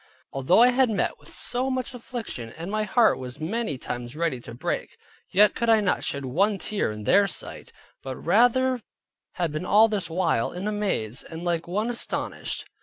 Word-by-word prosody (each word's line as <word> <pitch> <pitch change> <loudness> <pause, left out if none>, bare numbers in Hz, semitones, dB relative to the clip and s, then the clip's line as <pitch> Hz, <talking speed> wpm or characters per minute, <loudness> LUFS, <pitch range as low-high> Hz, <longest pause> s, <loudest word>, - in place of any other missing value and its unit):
Although 135 - +4
I 250 - +7
had 255 0 +3
met 200 -5 -1
with - - -15
so 250 +2 0
much 255 -1 -2
affliction, 230 - -6
and 170 +4 -5
my 215 0 0
heart 225 +2 +3
was 130 +1 -7
many 170 - -2
times 120 +1 -5
ready 160 -5 -1
to 115 0 -10
break, - - -3 0.3
yet 210 +2 +5
could 235 - -1
I 225 -1 +6
not 200 -3 0
shed 140 -1 -2
one 195 +10 +1
tear 205 - -1
in 105 0 -7
their 200 - +4
sight; - - -6 0.3
but 130 -1 -5
rather 245 - +3 0.5
had 170 -3 -1
been 155 +3 -3
all 210 +4 +6
this 205 -5 -1
while 165 -9 0
in 180 +4 -4
a - - 0
maze, 160 - -2
and 165 +1 -9
like 170 -1 -1
one 210 +7 -1
astonished. 235 - -3
195 Hz, 190 wpm, -25 LUFS, 145-225 Hz, 0.5 s, I